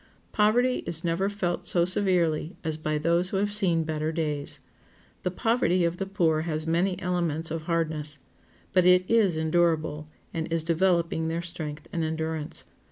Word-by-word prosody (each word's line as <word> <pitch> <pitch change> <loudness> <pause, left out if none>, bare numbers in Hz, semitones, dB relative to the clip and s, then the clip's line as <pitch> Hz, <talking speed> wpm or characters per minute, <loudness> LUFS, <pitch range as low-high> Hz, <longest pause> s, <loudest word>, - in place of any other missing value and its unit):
Poverty 240 +4 +3
is 165 -1 -3
never 175 +3 0
felt 185 -4 -2
so 170 -1 +4
severely 175 -3 +2
as 160 -2 -1
by 155 0 -2
those 170 +4 +1
who 195 - -1
have 205 +1 0
seen 175 -6 +3
better 155 0 -2
days. 150 -3 -2 0.6
The - - -1
poverty 185 -3 +1
of 170 +1 -1
the 195 - -3
poor 170 -6 +1
has 155 -1 -3
many 175 +3 +1
elements 170 -4 -1
of 160 -1 -4
hardness, 155 -3 -2 0.6
but 185 -1 +5
it 180 0 +5
is 210 -8 +3
endurable, 160 -2 +1 0.3
and 160 0 -3
is 165 -1 0
developing 170 -1 +1
their 165 +1 -2
strength 155 -3 -6
and 165 - -1
endurance. 160 -1 -3
170 Hz, 165 wpm, -27 LUFS, 160-180 Hz, 0.6 s, but